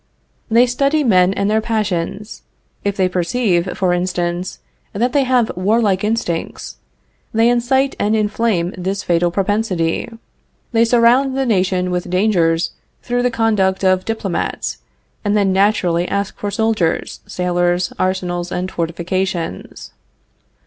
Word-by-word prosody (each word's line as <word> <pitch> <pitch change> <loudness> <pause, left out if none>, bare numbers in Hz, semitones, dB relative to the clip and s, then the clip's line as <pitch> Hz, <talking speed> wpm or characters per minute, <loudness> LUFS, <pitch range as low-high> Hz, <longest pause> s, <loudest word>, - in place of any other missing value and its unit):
They 235 +2 +5
study 275 +5 +1
men 185 -6 +4
and 200 0 -1
their 215 +1 +2
passions. 210 -2 -3 0.4
If 200 -1 -1
they 190 -1 +3
perceive, 180 0 0
for 185 -2 +1
instance, 175 0 -2 0.4
that 240 +5 0
they 280 -2 +3
have 250 -3 +1
warlike 200 +1 +1
instincts, 210 -6 -3 0.6
they 225 +1 +4
incite 255 +3 +2
and 210 +2 +1
inflame 210 -4 0
this 190 +2 -3
fatal 175 0 +2
propensity. 190 -2 -1 0.6
They 230 -1 +4
surround 245 +3 +3
the 270 - +1
nation 185 -4 +1
with 180 0 -2
dangers 180 -3 +2 0.3
through 245 0 0
the 250 - +2
conduct 210 -5 +1
of 185 -1 +3
diplomats, 220 -5 -3 0.4
and 205 0 +1
then 195 -2 +2
naturally 185 -3 +2
ask 200 0 -2
for 205 - -4
soldiers, 205 -5 0
sailors, 175 0 0
arsenals 180 -1 -1
and 185 +1 -3
fortifications. 170 - -3
195 Hz, 130 wpm, -18 LUFS, 180-225 Hz, 0.6 s, They